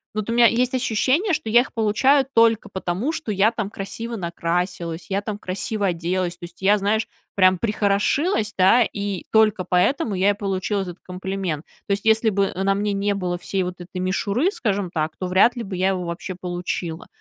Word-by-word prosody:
вот 215 +1 -3
у - - 0
меня 240 0 +6
есть 245 +2 +2
ощущение, 260 - +1
что 225 -7 -2
я 235 - +6
их 245 - -2
получаю 260 +6 +3
только 230 -1 +3
потому, 190 - -2
что 235 -9 -4
я 200 +3 +3
там 220 -4 -3
красиво 225 +4 -6
накрасилась, 170 -2 -3
я 195 +1 0
там 205 0 -4
красиво 200 +1 -2
оделась, 175 +1 -1
то - - -8
есть 175 +2 -15
я, 205 +2 +4
знаешь, 210 +3 0 0.3
прям 185 -1 +5
прихорошилась, 210 - +1
да, 190 +6 +5
и 200 -3 -4
только 215 -4 +4
поэтому 205 - +1
я 190 +2 +3
и - - +4
получила 195 0 -2
этот 180 -1 -8
комплимент. 185 -4 -4 0.2
То - - -5
есть 200 +2 -1
если 220 +1 +4
бы, 200 -1 +1
э, 190 0 -3
на 195 0 +2
мне 205 0 -1
не 200 +1 0
было 180 -3 -2
всей 190 +2 -2
вот 180 0 -3
этой 180 +1 -9
мишуры, 200 - 0
скажем 200 - -1
так, 160 -2 -2
то 185 - -2
вряд 195 +7 +4
ли 235 - -3
бы 195 -3 -6
я 185 +1 +1
его 185 -2 -2
вообще 170 +2 -5
получила. 175 -2 -4
200 Hz, 200 wpm, -22 LUFS, 185-220 Hz, 0.3 s, меня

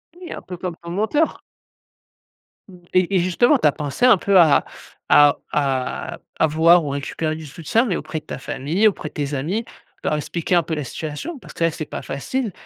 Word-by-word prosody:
Oui, 355 -1 -10
un - - -6
peu 180 - -8
comme 175 -1 -4
ton 170 - -9
mentor! 220 - 0 1.3
Mmh 185 -3 -14
et 185 +1 +2
et - - +5
justement, 185 - +3
tu 160 - +3
as - - +4
pensé 145 - -1
un 250 -5 +7
peu 195 +2 +3
à 160 -4 +5 0.4
à 145 -1 +6 0.2
à 135 -3 -1 0.2
avoir 160 +2 +5
ou 145 - -3
récupérer 140 +3 -3
du 160 0 -8
soutien, 165 - 0
mais 195 -8 -1
auprès 160 - -4
de - - -28
ta - - -6
famille, 155 +10 0
auprès 185 -7 -2
de - - -30
tes 145 -1 -3
amis, 175 - -2 0.4
leur 150 - +1
expliquer 170 +4 -1
un 170 - +4
peu 160 +1 -3
la 150 - -3
situation? 160 - -6
Parce - - -13
que - - -3
là, 165 - +3
c'est 155 0 -5
pas - - -6
facile 225 - -3
165 Hz, 210 wpm, -21 LUFS, 150-200 Hz, 1.3 s, un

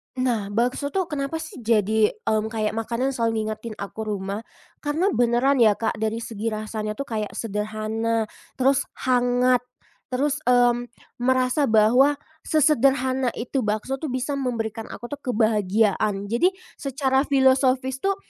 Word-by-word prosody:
Nah, 240 -5 0
bakso 240 +7 0
tuh 365 -3 0
kenapa 275 +1 -2
sih 320 - -10
jadi 220 - +2
mmm 215 0 +1
kayak 220 -1 -1
makanan 235 +4 -1
selalu 230 -3 0
ngingetin 215 +1 -5
aku 215 +2 -6
rumah, 200 +2 -4 0.3
karena 320 +7 0
beneran 245 +1 +2
ya 215 -3 +5
Kak 220 +1 -1
dari 220 +1 -2
segi 225 0 -5
rasanya 215 -1 -3
tuh 275 - -3
kayak 215 -5 -4
sederhana, 215 +1 -2 0.3
terus 270 +1 +2
hangat, 250 0 +2 0.5
terus 280 +3 0
mmm 245 -1 +3 0.3
merasa 255 +3 +2
bahwa, 235 +7 +5 0.3
sesederhana 265 -4 +3
itu 250 +3 -2
bakso 215 +4 -2
tuh 310 - -4
bisa 265 +2 -2
memberikan 225 -4 -3
aku 240 +3 -9
tuh 290 - -5
kebahagiaan. 210 -3 +1
Jadi, 240 +10 +3 0.3
secara 270 0 0
filosofis 265 -1 +3
tuh 395 +6 +1
240 Hz, 140 wpm, -24 LUFS, 220-265 Hz, 0.5 s, ya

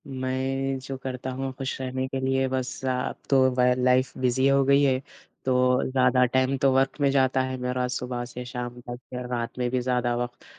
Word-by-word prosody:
मैं 135 0 -2
जो 135 - -5
करता 130 0 -5
हूँ 135 +1 -3
ख़ुश 135 -1 -4
रहने 130 0 -2
के 135 0 -3
लिए 135 0 +1
बस 130 0 -3
अब 125 -1 -1
तो 130 -1 +5
ब 125 0 +3
लाइफ़ 130 +1 +3
बिज़ी 130 +1 +2
हो 140 0 +4
गई 140 +1 +5
है। 130 -2 +2 0.4
तो 125 0 +3
ज़्यादा 125 -1 +4
टाइम 130 +2 +1
तो 135 - +4
वर्क 135 +2 +1
में 140 - +4
जाता 130 -1 +2
है 130 0 -3
मेरा 125 0 -1
सुबह 125 0 -3
से 125 +1 -8
शाम 125 -1 -6
तक। 120 0 -7
फ़िर 125 0 -5
रात 120 -1 -3
में 125 -1 0
भी 130 - +1
ज़्यादा 125 -1 0
वक़्त 120 0 -5
130 Hz, 205 wpm, -26 LUFS, 125-135 Hz, 0.4 s, तो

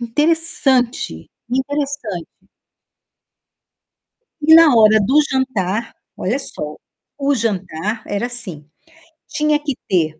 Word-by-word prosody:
interessante, 260 - 0 0.2
interessante. 265 - -3 2.1
E 315 +2 +6
na 325 -3 +8
hora 220 -1 +6
do 265 +9 +4
jantar 230 -5 -1 0.2
olha 230 +9 -1
só, 150 - -6 0.4
o 280 0 +1
jantar 210 -3 -3
era 205 +4 -2
assim. 190 -12 -8 0.6
Tinha 300 0 +1
que 295 -3 -3
ter 160 -4 0
240 Hz, 95 wpm, -18 LUFS, 195-285 Hz, 2.1 s, na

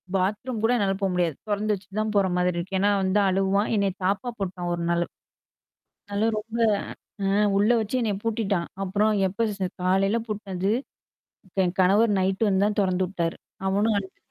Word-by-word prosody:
Bathroom 210 +5 -1
கூட 225 - +3
என்னால 200 -3 +1
போ - - +2
முடியாது. 175 -4 0
தொறந்து 210 +1 +1
வச்சுட்டு 195 +1 -7
தான் 215 0 -2
போற 200 -1 +4
மாதிரி 180 0 +1
இருக்கு. 190 +2 -3
ஏன்னா 205 +2 +3
வந்து 190 +2 +2
அழுவான். 195 +3 +1
என்னைய 200 -2 +1
தாப்பா 200 +6 0
போட்டான் 180 -2 -3
1 170 0 -3
நாளு. 170 0 +1 1.1
நல்ல 210 +3 +1
ரொம்ப 225 +2 -7 0.7
அ - - +1 0.3
உள்ள 210 +3 +3
வச்சு 220 +4 -1
என்னைய 210 -3 0
பூட்டிட்டான். 205 -6 0 0.2
அப்புறம் 205 +3 +2 0.2
எப்ப 225 +5 -1
ஸ் - - -4 0.2
காலையில 195 +4 +2
பூட்னது. 200 -2 -2 0.9
என் 180 0 -1
கணவர் 205 +4 +4
நைட் 190 +3 +1
வந்து 190 0 +2
தான் 210 0 -1
தொறந்து 185 -1 +1
விட்டாரு. 170 -3 -2 0.3
அவனும் 205 +3 +2
அழுது 190 -1 -10
195 Hz, 170 wpm, -25 LUFS, 185-210 Hz, 1.1 s, போற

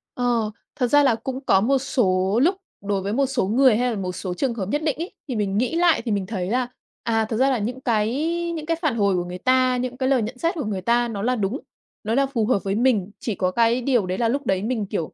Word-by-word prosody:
Ờ, 240 -3 0 0.2
thật 255 -4 +1
ra 290 +3 +5
là 250 -5 +4
cũng 260 +3 -5
có 190 - +4
một 270 +6 +3
số 210 -7 +1
lúc 360 +5 +3 0.3
đối 200 -1 -1
với 200 +2 -3
một 275 +4 +2
số 265 -5 0
người 250 +2 +4
hay 250 +1 +1
là 225 - -3
một 185 -2 -3
số 180 0 -5
trường 245 +6 -1
hợp 195 -5 -4
nhất 295 +7 0
định 305 -3 0
ấy, 340 +3 -4 0.2
thì 255 - -3
mình 200 -2 -1
nghĩ 250 +8 0
lại 340 -1 +3
thì 230 - -1
mình 200 -2 0
thấy 185 -3 -3
là, 250 +2 0 0.4
à, 225 -1 +1
thật 220 - -1
ra 265 +2 +3
là 260 - +1
những 245 +5 -4
cái 220 -3 +1 0.5
những 310 -2 -5
cái 330 0 0
phản 300 -8 +1
hồi 200 -4 +2
của 175 - 0
người 180 +1 -6
ta, 255 +4 +2
những 250 0 -3
cái 260 0 0
lời 265 -3 +3
nhận 230 +4 -4
xét 335 +6 0
của 295 -8 -3
người 195 -3 -3
ta 240 +4 +2
nó 210 -4 -4
là 250 +4 +1
đúng, 215 +4 -2 0.4
nó 220 - -1
là 275 +3 +3
phù 250 -5 -1
hợp 210 -4 +1
với 195 0 -1
mình. 220 -5 +1
Chỉ 220 -2 -3
có 185 -1 0
cái 235 +4 +2
điều 240 -5 +2
đấy 185 +1 -3
là 230 -1 +1
lúc 280 +3 -1
đấy 190 -3 0
mình, 225 -2 -1
kiểu, 185 -5 -4
235 Hz, 280 wpm, -23 LUFS, 205-260 Hz, 0.5 s, ra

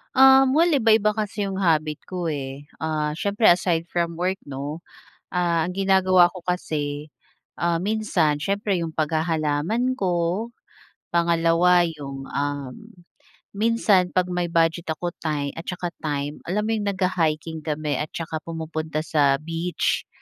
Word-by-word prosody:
Um, 265 0 +7
well 325 +4 +4
iba-iba 220 -4 +3
kasi 205 -1 -2
yung 190 - -4
habit 155 -5 +1
ko 180 -2 -4
eh. 140 -1 -5 0.2
Ah, 155 -1 -1
siyempre 205 +5 +1
aside 175 -1 +3
from 170 -1 -2
work 185 +2 +1
'no, 145 +4 -6 0.5
ah, 170 -2 +1
ang 180 - -5
ginagawa 190 -2 +4
ko 185 - -9
kasi, 150 -4 -3 0.5
ah, 170 0 +1
minsan 180 -5 0
siyempre 200 +3 -1
yung 165 -2 -4
paghahalaman 160 +10 0
ko, 180 +3 0 0.7
pangalawa 170 +1 +4
yung 140 -4 -7
um, 140 -2 -3 0.8
minsan 205 -4 +2
pag 180 0 +1
may 175 -1 -1
budget 165 0 +1
ako 170 +2 -2
ti 160 - -5
time 145 -2 -1
at - - -7
saka 180 -1 -3 0.2
time 145 -1 -3
alam 205 +4 0
mo - - 0
yung 210 -2 -2
nag-ha-hiking 165 -4 -1
kami 150 -1 -2
at 150 - -2
saka 160 -1 -4
pumupunta 160 -1 -4
sa 145 -4 +3
beach. 165 +4 -2
170 Hz, 140 wpm, -23 LUFS, 155-185 Hz, 0.8 s, Um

